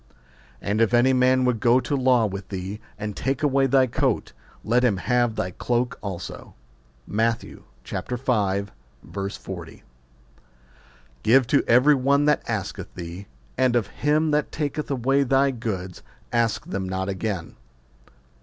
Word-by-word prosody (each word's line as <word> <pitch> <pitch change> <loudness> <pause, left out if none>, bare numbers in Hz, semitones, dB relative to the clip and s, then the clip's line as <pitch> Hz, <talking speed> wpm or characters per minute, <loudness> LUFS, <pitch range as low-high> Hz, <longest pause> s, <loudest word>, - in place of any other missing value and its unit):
And 105 +2 0
if 115 +1 +3
any 125 +2 +4
man 130 0 +3
would 125 -3 +1
go 120 +3 +4
to 130 +3 -2
law 130 -3 +3
with 100 -1 -5
thee, 95 +2 -5 0.2
and 105 -1 -5
take 135 +3 -2
away 135 -2 +3
thy 135 0 +4
coat, 120 - -1 0.3
let 120 +3 +2
him 110 -6 +3
have 120 +3 +1
thy 90 - -2
cloke 120 +6 -1
also. 95 -4 -7 0.5
Matt. 110 +2 0
v. - - -11 0.3
40. 100 - -4 1.4
Give 130 - +5
to 140 +4 +2
every 125 +6 +6
one 140 +2 +2
that 150 -1 +3
asketh 105 -5 -4
thee; 90 +3 -7 0.3
and 130 -2 +3
of 120 -4 +2 0.2
him 150 +2 +2
that 150 0 0
taketh 150 0 -3
away 135 +1 +2
thy 135 +1 +3
goods 100 -7 -5 0.3
ask 115 -2 +1
them 95 -1 -4
not 95 0 -2
again. 95 -3 -3
120 Hz, 140 wpm, -24 LUFS, 100-130 Hz, 1.4 s, every